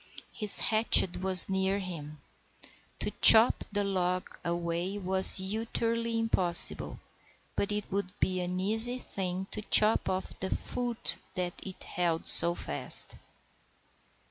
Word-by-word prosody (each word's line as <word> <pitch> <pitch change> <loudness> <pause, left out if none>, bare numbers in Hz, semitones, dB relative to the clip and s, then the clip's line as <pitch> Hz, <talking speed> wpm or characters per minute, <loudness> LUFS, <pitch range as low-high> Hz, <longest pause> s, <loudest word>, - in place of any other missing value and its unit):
His 210 -2 +4
hatchet 215 -4 +2
was 185 -1 +7
near 190 0 -4
him. 155 -6 -11 0.8
To - - -4
chop 225 +1 +7
the 205 0 -4
log 185 -2 -6
away 170 +3 -6
was 190 -1 +5
utterly 230 +3 -5
impossible, 190 -6 +1 0.6
but 200 - -5
it 210 0 -6
would 195 -1 -6
be 185 -1 -4
an 180 +1 -7
easy 225 +6 0
thing 190 -5 -8
to 210 - -7
chop 215 0 +4
off 185 0 -8
the 190 - -7
foot 245 +2 -5 0.2
that 180 -2 -6
it 190 -2 -11
held 170 -2 -6
so 170 +1 +5
fast. 70 - -5
190 Hz, 125 wpm, -26 LUFS, 180-215 Hz, 0.8 s, was